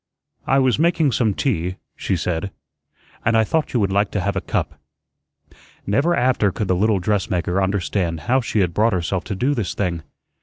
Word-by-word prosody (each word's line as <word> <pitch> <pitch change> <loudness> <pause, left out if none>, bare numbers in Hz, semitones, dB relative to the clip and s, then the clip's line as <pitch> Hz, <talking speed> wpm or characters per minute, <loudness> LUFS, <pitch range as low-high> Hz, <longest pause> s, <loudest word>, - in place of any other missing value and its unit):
"I 135 - +3
was 130 -1 +2
making 165 -3 +3
some 110 -4 +1
tea," 90 - -1 0.2
she 95 - -1
said, 90 +2 -2 0.7
"and 115 -1 +3
I 110 - +5
thought 155 +7 -1
you 120 - +1
would 100 -3 +1
like 100 +1 +2
to 105 - 0
have 100 +2 -1
a - - -1
cup." - - -3 1.1
Never 140 - +2
after 120 -5 +2
could 105 - -3
the 95 - +2
little 105 +3 +2
dressmaker 95 -2 0
understand 95 -4 -1
how 130 - +2
she 110 -3 0
had 90 -2 0
brought 110 +4 +2
herself 90 +1 -1
to 100 - -3
do 130 +9 +1
this 115 -9 -2
thing. 85 -4 -1
100 Hz, 190 wpm, -21 LUFS, 90-120 Hz, 1.1 s, I